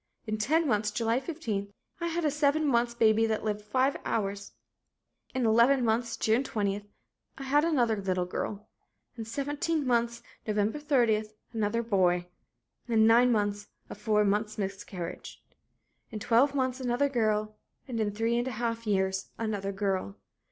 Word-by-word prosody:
In 215 Hz, -1 st, -3 dB
ten 310 Hz, +8 st, +2 dB
months, 210 Hz, -3 st, +1 dB
July 230 Hz, +3 st, 0 dB
15, 225 Hz, -, -4 dB, 0.3 s
I 340 Hz, -, -1 dB
had 340 Hz, 0 st, -1 dB
a 300 Hz, -, +2 dB
seven 295 Hz, +1 st, +2 dB
months 240 Hz, -3 st, +2 dB
baby 225 Hz, -1 st, +4 dB
that 220 Hz, -1 st, -1 dB
lived 210 Hz, -1 st, -2 dB
five 260 Hz, +6 st, +1 dB
hours. 200 Hz, -2 st, -2 dB, 0.8 s
In 255 Hz, -2 st, +1 dB
eleven 235 Hz, +4 st, +4 dB
months, 230 Hz, +1 st, 0 dB
June 225 Hz, +4 st, +2 dB
20, 205 Hz, -5 st, -2 dB, 0.5 s
I 275 Hz, -, -7 dB
had 290 Hz, +3 st, +3 dB
another 250 Hz, -9 st, +2 dB
little 185 Hz, -3 st, -1 dB
girl. 205 Hz, +3 st, -4 dB, 0.5 s
In 225 Hz, -2 st, -6 dB
seventeen 290 Hz, +6 st, -2 dB
months, 235 Hz, -1 st, 0 dB, 0.2 s
Nov. 210 Hz, 0 st, +1 dB
30, 245 Hz, -8 st, +2 dB, 0.3 s
another 225 Hz, +1 st, 0 dB
boy. 180 Hz, -5 st, +2 dB, 0.6 s
In 225 Hz, -2 st, +4 dB
nine 240 Hz, +2 st, +6 dB
months 205 Hz, -2 st, 0 dB, 0.2 s
a -, -, -3 dB
four 210 Hz, 0 st, +1 dB
months' 210 Hz, +1 st, 0 dB
miscarriage. 195 Hz, -3 st, -6 dB, 0.7 s
In 220 Hz, -, -6 dB
twelve 240 Hz, +7 st, +3 dB
months 260 Hz, -1 st, 0 dB
another 255 Hz, +2 st, +1 dB
girl, 215 Hz, -4 st, 0 dB, 0.3 s
and 240 Hz, -3 st, -3 dB
in 215 Hz, -1 st, +1 dB
three 225 Hz, +3 st, 0 dB
and 240 Hz, -, -2 dB
a -, -, -2 dB
half 230 Hz, -1 st, -2 dB
years 190 Hz, -1 st, 0 dB
another 205 Hz, -3 st, -2 dB
girl. 190 Hz, -, -2 dB
225 Hz, 155 wpm, -29 LUFS, 210-255 Hz, 0.8 s, nine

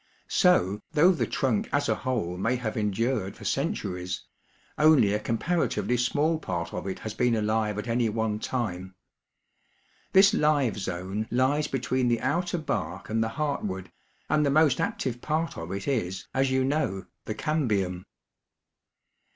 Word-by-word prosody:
So, 105 Hz, -, +3 dB
though 165 Hz, +4 st, +6 dB
the 175 Hz, -, 0 dB
trunk 125 Hz, -6 st, 0 dB
as 145 Hz, -, +1 dB
a -, -, +3 dB
whole 115 Hz, -10 st, -2 dB
may 115 Hz, +7 st, 0 dB
have 120 Hz, -3 st, -3 dB
endured 110 Hz, 0 st, -1 dB
for -, -, -11 dB
centuries, 90 Hz, -1 st, -2 dB, 0.5 s
only 150 Hz, -10 st, +5 dB
a 105 Hz, -, +1 dB
comparatively 115 Hz, -, 0 dB
small 145 Hz, +6 st, +1 dB
part 85 Hz, -, -4 dB
of -, -, -4 dB
it 95 Hz, -, -3 dB
has 110 Hz, -, -6 dB
been 125 Hz, -2 st, +2 dB
alive 110 Hz, -1 st, 0 dB
at 105 Hz, -, -4 dB
any 115 Hz, -1 st, +1 dB
one 110 Hz, -1 st, -1 dB
time. 95 Hz, -7 st, -3 dB, 1.2 s
This 195 Hz, +2 st, +6 dB
live 145 Hz, -, +2 dB
zone 95 Hz, +3 st, -3 dB
lies 130 Hz, +5 st, +2 dB
be 135 Hz, -, -2 dB
tween 125 Hz, 0 st, 0 dB
the 120 Hz, -1 st, +1 dB
outer 175 Hz, +7 st, 0 dB
bark 155 Hz, -7 st, -3 dB
and 110 Hz, +1 st, +2 dB
the 110 Hz, -, -1 dB
heartwood, 105 Hz, -11 st, -2 dB, 0.4 s
and 150 Hz, -1 st, +2 dB
the 145 Hz, -, +2 dB
most 145 Hz, -2 st, +4 dB
active 120 Hz, -2 st, -2 dB
part 160 Hz, +2 st, -1 dB
of 80 Hz, +1 st, -6 dB
it 100 Hz, 0 st, -4 dB
is, 95 Hz, -9 st, -2 dB
as 135 Hz, 0 st, +2 dB
you 130 Hz, 0 st, +2 dB
know, 130 Hz, -9 st, -1 dB, 0.2 s
the 110 Hz, -, -4 dB
cambium. 105 Hz, -, -1 dB
120 Hz, 160 wpm, -27 LUFS, 100-145 Hz, 1.2 s, though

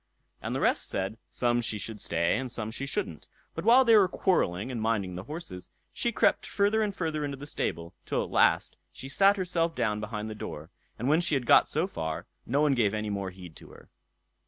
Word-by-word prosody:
And -, -, -3 dB
the -, -, -1 dB
rest -, -, +2 dB
said, 100 Hz, +4 st, -3 dB
some 120 Hz, -1 st, +1 dB
she 110 Hz, -2 st, -2 dB
should 105 Hz, 0 st, -6 dB
stay, 85 Hz, +1 st, +1 dB
and 130 Hz, -2 st, -5 dB
some 110 Hz, -2 st, -4 dB
she 140 Hz, +4 st, -5 dB
shouldn't; 85 Hz, -, -4 dB, 0.3 s
but -, -, -5 dB
while 245 Hz, +5 st, +6 dB
they 230 Hz, -1 st, +6 dB
were 200 Hz, -3 st, +6 dB
quarrelling 130 Hz, -, 0 dB
and 120 Hz, -3 st, -3 dB
minding 105 Hz, -5 st, 0 dB
the 90 Hz, +2 st, -7 dB
horses, 145 Hz, -, -7 dB, 0.2 s
she -, -, 0 dB
crept -, -, +2 dB
further 205 Hz, +2 st, +2 dB
and 205 Hz, -2 st, -1 dB
further 160 Hz, -4 st, -2 dB
into 140 Hz, -1 st, -3 dB
the 140 Hz, -, -8 dB
stable, 85 Hz, -, -3 dB
till -, -, 0 dB
at -, -, -8 dB
last -, -, +3 dB
she 135 Hz, -, -9 dB
sat 195 Hz, +8 st, +4 dB
herself 170 Hz, -3 st, 0 dB
down 105 Hz, -4 st, 0 dB
behind 105 Hz, 0 st, -4 dB
the 110 Hz, -, -5 dB
door; 80 Hz, -5 st, -7 dB, 0.3 s
and 125 Hz, -, -3 dB
when 155 Hz, +4 st, +4 dB
she 170 Hz, -3 st, 0 dB
had 130 Hz, -3 st, -1 dB
got -, -, +6 dB
so -, -, 0 dB
far, 80 Hz, -1 st, -4 dB, 0.2 s
no 140 Hz, +4 st, +2 dB
one 150 Hz, -2 st, +4 dB
gave 110 Hz, -5 st, +2 dB
any 105 Hz, -1 st, -2 dB
more 100 Hz, -1 st, -3 dB
heed 90 Hz, -3 st, -12 dB
to -, -, -14 dB
her. -, -, -16 dB
120 Hz, 225 wpm, -28 LUFS, 100-160 Hz, 0.3 s, while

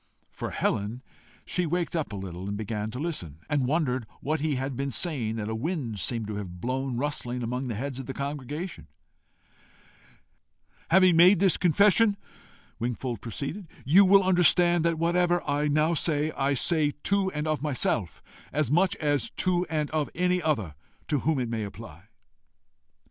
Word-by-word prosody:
For -, -, -5 dB
Helen, 110 Hz, +6 st, -2 dB, 0.4 s
she 180 Hz, -2 st, -1 dB
waked 175 Hz, +2 st, -1 dB
up 155 Hz, -8 st, -2 dB
a -, -, -5 dB
little, 95 Hz, 0 st, -6 dB
began 105 Hz, +1 st, -3 dB
to 120 Hz, -, -7 dB
listen, 130 Hz, -, -4 dB
and 145 Hz, -4 st, 0 dB
wondered 130 Hz, -6 st, 0 dB
what 155 Hz, +2 st, -1 dB
he 150 Hz, -1 st, 0 dB
had 135 Hz, +1 st, -3 dB
been 140 Hz, +2 st, -2 dB
saying 130 Hz, -6 st, -1 dB
that 105 Hz, -2 st, -4 dB
a 110 Hz, -, -3 dB
wind 120 Hz, -, -3 dB
seemed 115 Hz, 0 st, -1 dB
to 105 Hz, -1 st, -5 dB
have 90 Hz, -4 st, -7 dB
blown 130 Hz, +3 st, -2 dB
rustling 125 Hz, -3 st, -2 dB
among 125 Hz, +3 st, -3 dB
the 115 Hz, -, -3 dB
heads 135 Hz, +3 st, -4 dB
of 130 Hz, -, -7 dB
the 135 Hz, -, -4 dB
congregation. 145 Hz, +5 st, -5 dB, 2.0 s
"Having 185 Hz, -1 st, +5 dB
made 180 Hz, +2 st, +7 dB
this 195 Hz, -2 st, +4 dB
confession," 200 Hz, +4 st, +4 dB, 0.6 s
Wingfold 120 Hz, -1 st, -3 dB
proceeded, 140 Hz, -, -5 dB, 0.2 s
"you 180 Hz, +9 st, +7 dB
will 195 Hz, +1 st, +6 dB
understand 175 Hz, -2 st, +4 dB
that 165 Hz, -1 st, +1 dB
whatever 175 Hz, +1 st, +1 dB
I 145 Hz, +1 st, +1 dB
now 155 Hz, +3 st, +2 dB
say, 155 Hz, -1 st, 0 dB
I 140 Hz, -1 st, 0 dB
say 150 Hz, +2 st, +2 dB
to 200 Hz, -1 st, +1 dB
and 150 Hz, +1 st, -2 dB
of 155 Hz, -1 st, -1 dB
myself 125 Hz, -, -1 dB, 0.3 s
as 150 Hz, -4 st, 0 dB
much 180 Hz, +4 st, +3 dB
as 145 Hz, -3 st, 0 dB
to 180 Hz, -1 st, 0 dB
and 155 Hz, -2 st, -1 dB
of 155 Hz, -2 st, -1 dB
any 180 Hz, +1 st, +1 dB
other 120 Hz, -, -1 dB, 0.4 s
to 145 Hz, -, +1 dB
whom 155 Hz, +3 st, 0 dB
it 125 Hz, -2 st, -1 dB
may 115 Hz, -1 st, -3 dB
apply." 95 Hz, -4 st, -10 dB
145 Hz, 165 wpm, -27 LUFS, 120-170 Hz, 2.0 s, made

